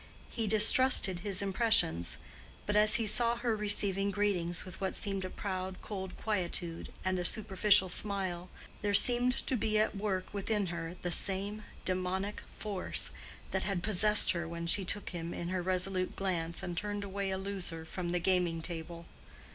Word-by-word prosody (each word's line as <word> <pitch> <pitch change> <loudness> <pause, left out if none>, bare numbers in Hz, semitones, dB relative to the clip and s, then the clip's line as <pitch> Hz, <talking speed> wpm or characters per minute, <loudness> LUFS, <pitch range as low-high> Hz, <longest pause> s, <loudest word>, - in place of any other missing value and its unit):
He 225 -2 -2
distrusted 215 -2 +3
his 195 0 0
impressions; 195 - +2 0.5
but 205 - -1
as 215 0 +5
he 230 - +2
saw 235 +2 +2
her 235 -1 -1
receiving 200 -2 +1
greetings 185 -4 0
with 185 0 -10
what 190 - -1
seemed 195 -3 -1
a 185 - -4
proud 185 -1 -4
cold 190 -3 -6
quietude 175 -5 -2
and 185 -1 0
a - - -1
superficial 200 0 +4
smile, 185 -2 +1 0.3
there 205 -1 +1
seemed 245 +3 +2
to 265 - +1
be 215 -2 0
at 215 0 +1
work 195 -2 -3
within 205 0 -1
her 165 +1 -5
the 175 - -2
same 200 +4 +2 0.2
demonic 185 +2 -2 0.2
force 205 -3 0 0.4
that 190 - -1
had 190 -3 -1
possessed 210 0 +5
her 170 -1 -3
when 170 0 -5
she 190 +4 +3
took 205 +3 -2
him 170 -1 -5
in 170 - -4
her 185 0 -1
resolute 185 0 -1
glance 170 -3 -2
and 175 -1 -4
turned 205 +1 -2
away 200 0 -3
a 190 - -1
loser 190 -4 -3
from 175 +1 -4
the 180 - +1
gaming 175 -2 +1
table. 170 0 -5
190 Hz, 170 wpm, -32 LUFS, 180-210 Hz, 0.5 s, as